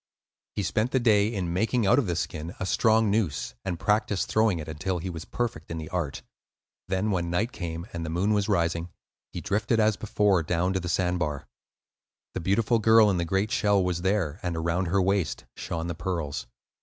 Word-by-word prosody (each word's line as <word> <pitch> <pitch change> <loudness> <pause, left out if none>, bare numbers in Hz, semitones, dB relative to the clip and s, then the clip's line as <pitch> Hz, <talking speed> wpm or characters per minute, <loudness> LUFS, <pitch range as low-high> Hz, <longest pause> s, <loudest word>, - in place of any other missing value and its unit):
He 105 - -1
spent 110 +4 0
the 130 - +2
day 105 -4 +4
in 90 -6 -2
making 110 +5 +1
out 120 +7 +5
of 125 - 0
the 85 - -1
skin 80 +2 -4
a 95 - -2
strong 110 +1 +3
noose, 100 -9 -1
and 90 -3 -3
practised 105 -3 +1
throwing 110 -4 +3
it 75 -2 -6
until 85 +4 -2
he 90 +2 -4
was 80 -2 -7
perfect 115 -10 -3
in 85 - -4
the 80 -1 -6
art. 85 -6 -3 0.6
Then, 95 +3 0
when 85 -3 -1
night 105 +8 0
came 85 -1 -5
and 85 -1 -4
the 80 - -4
moon 95 +6 +1
was 105 0 +1
rising, 85 -2 0 0.4
he - - -5
drifted 110 +3 0
as 110 -1 +3
before 105 -4 +2
down 85 +3 0
to 95 - 0
the 90 -1 -4
sand 90 0 +1
bar. 75 -4 -2 0.9
The - - -3
beautiful 110 +6 +2
girl 110 -1 +6
in 95 - 0
the 85 - 0
great 95 +5 0
shell 100 -3 +3
was 90 -1 -1
there, 95 -4 0
and 90 -3 -2
around 85 +3 0
her 95 +4 +2
waist 95 -3 0
shone 80 -1 -4
the 85 - -3
pearls. 80 -6 -3
95 Hz, 205 wpm, -27 LUFS, 85-105 Hz, 0.9 s, girl